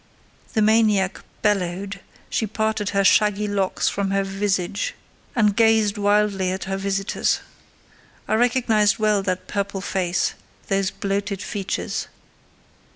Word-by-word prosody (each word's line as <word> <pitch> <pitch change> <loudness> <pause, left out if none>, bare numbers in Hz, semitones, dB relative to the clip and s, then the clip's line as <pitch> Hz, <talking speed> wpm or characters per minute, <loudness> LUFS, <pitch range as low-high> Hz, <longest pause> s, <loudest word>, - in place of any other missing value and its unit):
The 220 - +3
maniac 210 -3 +3 0.2
bellowed: 195 -1 0 0.3
she 220 - -1
parted 220 0 -1
her 200 0 +1
shaggy 210 +1 +3
locks 200 -2 0
from 200 -1 0
her 195 0 +1
visage, 195 -1 -1 0.4
and 210 -4 +3
gazed 220 -2 +4
wildly 205 -2 +2
at 190 0 -3
her 195 0 -3
visitors. 195 0 0 0.9
I - - 0
recognised 225 -3 +3
well 215 -2 +2
that 185 -1 -2
purple 200 -1 -2
face,—those 190 +1 -2
bloated 200 0 -3
features. 195 +3 -3
200 Hz, 115 wpm, -23 LUFS, 195-210 Hz, 0.9 s, gazed